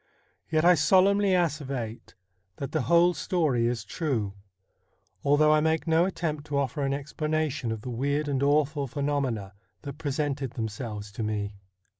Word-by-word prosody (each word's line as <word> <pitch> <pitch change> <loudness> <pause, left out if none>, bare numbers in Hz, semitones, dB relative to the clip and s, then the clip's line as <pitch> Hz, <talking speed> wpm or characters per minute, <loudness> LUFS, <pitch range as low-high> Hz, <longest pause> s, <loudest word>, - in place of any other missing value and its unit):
Yet 155 +1 +2
I 180 - +8
solemnly 190 +5 +4
asseverate 140 -9 -2 0.4
that 140 - -5
the 155 - 0
whole 170 +5 +4
story 150 -8 +1
is 120 -3 -2
true, 110 - -2 0.9
although 150 +2 +4
I 155 - +4
make 160 +1 +1
no 165 +1 +3
attempt 155 -5 -3
to 145 -2 -1
offer 140 +1 -1
an 135 -1 0
explanation 150 -2 -2
of 110 -1 -4
the 125 - -6
weird 140 +5 -1
and 135 -2 0
awful 145 0 +2
phenomena 130 -7 -2 0.3
that 140 0 -7
presented 145 -3 -2
themselves 105 -2 -5
to 105 - -6
me. 105 -1 -2
145 Hz, 150 wpm, -27 LUFS, 120-155 Hz, 0.9 s, I